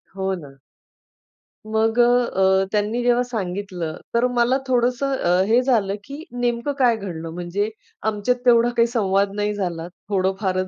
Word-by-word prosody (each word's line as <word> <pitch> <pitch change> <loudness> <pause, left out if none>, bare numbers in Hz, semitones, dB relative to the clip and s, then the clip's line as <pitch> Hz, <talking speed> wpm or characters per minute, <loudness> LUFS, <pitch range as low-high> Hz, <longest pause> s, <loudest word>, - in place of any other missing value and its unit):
हो 190 0 -1
ना. 140 -5 -12 1.1
मग 220 +1 +1
अ, - - +8 0.3
अ, 190 0 +3
त्यांनी 215 +3 0
जेव्हा 245 0 +3
सांगितलं, 185 -7 -4 0.2
तर 235 +1 +3
मला 240 +2 +3
थोडंसं 255 +2 +1
अ, 180 +2 +2
हे 235 +3 +4
झालं, 210 -6 +1
की 285 +5 -8
नेमकं 245 +2 -1
काय 240 -3 +4
घडलं. 165 -5 -6
म्हणजे 180 +5 -2 0.4
आमच्यात 215 +4 0
तेवढा 240 0 +5
काही 230 0 +5
संवाद 200 -4 +1
नाही 210 0 -1
झाला, 175 -4 -3 0.2
थोडं 190 -1 +1
फारच 185 -1 0
210 Hz, 150 wpm, -22 LUFS, 190-240 Hz, 1.1 s, अ